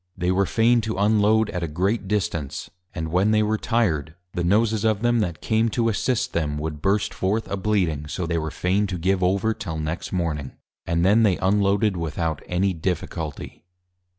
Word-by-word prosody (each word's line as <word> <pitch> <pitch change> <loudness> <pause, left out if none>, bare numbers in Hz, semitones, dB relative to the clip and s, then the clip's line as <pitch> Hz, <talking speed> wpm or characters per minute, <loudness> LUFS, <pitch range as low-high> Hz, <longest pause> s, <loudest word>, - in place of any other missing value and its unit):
They 90 0 0
were 95 +1 +2
fain 115 +1 +3
to 110 -1 -3
unload 105 +1 +3
at 90 - -3
a 85 - -1
great 95 +7 -1
Distance; 85 -8 -2 0.2
and 80 -2 -3
when 95 +4 +3
they 110 0 +3
were 110 0 0
Tired, 80 -10 0 0.2
the 85 - -2
Noses 105 +4 +2
of 110 -1 +1
them 120 0 +3
that 85 -7 -2
came 110 +1 +2
to 115 -1 +3
Assist 115 +3 -1
them, 75 -3 -1
would 75 0 -4
burst 100 +3 +1
forth 105 +4 -1
a - - -2
Bleeding; 95 -7 0
so 90 +3 -3
they 85 0 0
were 80 0 -3
fain 95 +5 0
to 95 -2 -3
give 95 +2 +1
over 95 +4 +2
till 85 -8 -5
next 80 +2 -4
morning; 80 -7 -2 0.3
and 85 +1 +1
then 105 +4 +5
they 100 -5 +3
unloaded 100 +1 +2
without 80 -2 -2
any 95 +2 +1
difficulty. 80 -2 -4
95 Hz, 190 wpm, -23 LUFS, 85-105 Hz, 0.3 s, then